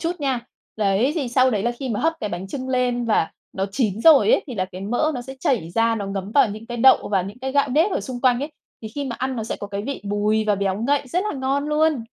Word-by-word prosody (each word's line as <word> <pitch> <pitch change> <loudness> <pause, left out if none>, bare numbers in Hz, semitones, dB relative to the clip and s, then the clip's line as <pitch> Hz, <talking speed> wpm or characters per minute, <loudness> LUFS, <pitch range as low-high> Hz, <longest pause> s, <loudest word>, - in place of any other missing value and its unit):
chút 335 +1 -1
nha. 265 -4 0 0.4
Đấy, 215 +6 +2
thì 290 -7 -2
sau 255 +1 +3
đấy 210 -4 0
là 240 +1 0
khi 260 +2 -6
mà 215 -4 -2
hấp 325 +1 +2
cái 210 - -2
bánh 185 0 -5
chưng 260 +4 -5
lên 250 -1 0
và 215 -7 +1 0.2
nó 190 0 -2
chín 220 -5 0
rồi 320 - +6
ấy, - - +3
thì 255 - -6
là 185 - 0
cái 185 0 -10
mỡ 245 +10 0
nó 245 - -4
sẽ 265 +2 -9
chảy 210 -13 0
ra, 230 +4 +2
nó 200 -3 -4
ngấm 195 0 -4
vào 275 -6 +4
những 215 +2 -8
cái 240 - -5
đậu 260 +3 +5
và 195 -3 +1
những 200 +5 -8
cái 265 +1 -4
gạo 280 0 +2
nếp 315 +10 +3
ở - - 0
xung 250 -2 -6
quanh 250 -2 +3
ấy, 295 +3 -4 0.3
thì 220 - -5
khi 285 -1 -3
mà 240 -3 -4
ăn 260 0 -2
nó 220 - -3
sẽ - - -4
có 205 - -6
cái 200 0 -4
vị 280 +4 -4
bùi 210 +2 +1
và 210 -1 +2
béo 195 -1 -1
ngậy 285 +3 +2
rất 360 +8 0
là - - -5
ngon 270 +2 0
luôn! 300 -5 +2
240 Hz, 290 wpm, -22 LUFS, 205-270 Hz, 0.4 s, rồi